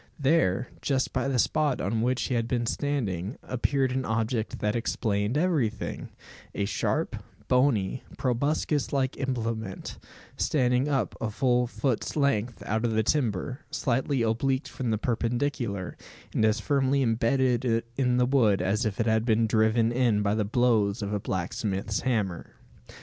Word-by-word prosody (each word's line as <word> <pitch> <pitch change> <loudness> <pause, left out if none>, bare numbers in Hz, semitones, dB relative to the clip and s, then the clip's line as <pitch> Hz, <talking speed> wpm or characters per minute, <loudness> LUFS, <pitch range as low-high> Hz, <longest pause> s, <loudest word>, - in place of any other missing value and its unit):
There, 135 - +2
just 135 -2 0
by 130 +1 0
the 135 -2 0
spot 150 +2 +1
on 110 +4 -1
which 125 +2 +1
he - - -2
had 115 -1 0
been 120 -1 0
standing, 115 - -2
appeared 130 +1 0
an 130 +1 -1
object 110 0 -1
that 105 +1 -1
explained 110 0 0
everything: 145 - -1 0.5
a 100 - 0
sharp, 100 -2 -1 0.3
bony, 125 -4 +2 0.2
proboscis 140 +1 0
like 135 -2 0
implement, 115 -6 -3 0.4
standing 125 -1 +2
up 135 -3 0
a 110 - -1
full 125 +2 +1
foot's 125 -1 -2
length 125 -6 0
out 110 +2 -1
of 115 -2 +1
the 110 - +3
timber, 125 -1 0
slightly 130 +1 0
obliqued 130 +5 0
from 130 -4 -4
the 110 - +1
perpendicular, 120 -3 -2 0.4
and - - +1
as 110 0 +2
firmly 140 -1 +1
imbedded 120 0 +1
in 125 -2 +2
the 125 - +4
wood 120 -7 +3
as 105 +6 +1
if 100 - -5
it 115 - +2
had 110 -1 +2
been 115 -1 +2
driven 110 +1 +2
in 120 -4 +2
by 100 0 +1
the 110 0 +1
blows 110 -2 +2
of 100 +1 -3
a 105 - 0
blacksmith's 95 +1 -2
hammer! 105 -9 -2
120 Hz, 155 wpm, -27 LUFS, 110-130 Hz, 0.5 s, the